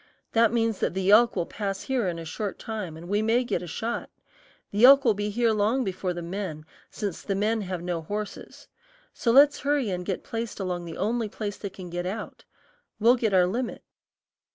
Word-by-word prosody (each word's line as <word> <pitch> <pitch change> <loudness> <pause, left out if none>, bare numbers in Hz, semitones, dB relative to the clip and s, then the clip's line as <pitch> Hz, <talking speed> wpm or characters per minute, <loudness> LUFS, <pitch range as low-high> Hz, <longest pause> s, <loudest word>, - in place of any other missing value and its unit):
That 230 -1 +4
means 225 -3 0
that - - -1
the 190 +1 +2
elk 235 +3 +6
will 175 -3 0
pass 195 -1 -4
here 255 -7 0
in 170 -2 -2
a 165 - -7
short 200 +5 -4
time 210 -8 -5
and 170 +2 -10
we 205 +3 +1
may 230 +3 +2
get 240 - -2
a 175 - -7
shot. 225 +8 -3 0.6
The 205 +3 0
elk 275 +2 +9
will 225 - +5
be 205 +1 -2
here 230 +2 +2
long 220 +5 +1
before 185 -3 -2
the 175 -1 -5
men, 170 -4 -5 0.2
since 200 -5 -4
the 200 - -2
men 215 +3 +1
have 185 -3 -4
no 175 -2 -2
horses; 205 +5 -6 0.5
so 235 - -1
let's 280 +4 +6
hurry 280 -6 0
and 180 -1 -3
get 185 0 -3
placed 230 -1 -5
along 180 -2 -3
the 165 -1 -7
only 225 +2 -1
place 205 -1 -5
they 200 - -5
can 185 -2 -10
get 175 +1 -3
out. 210 +3 -6 0.5
We'll 230 +3 +6
get 230 -4 0
our 180 -1 +6
limit." 230 +7 -3
205 Hz, 210 wpm, -26 LUFS, 180-230 Hz, 0.6 s, elk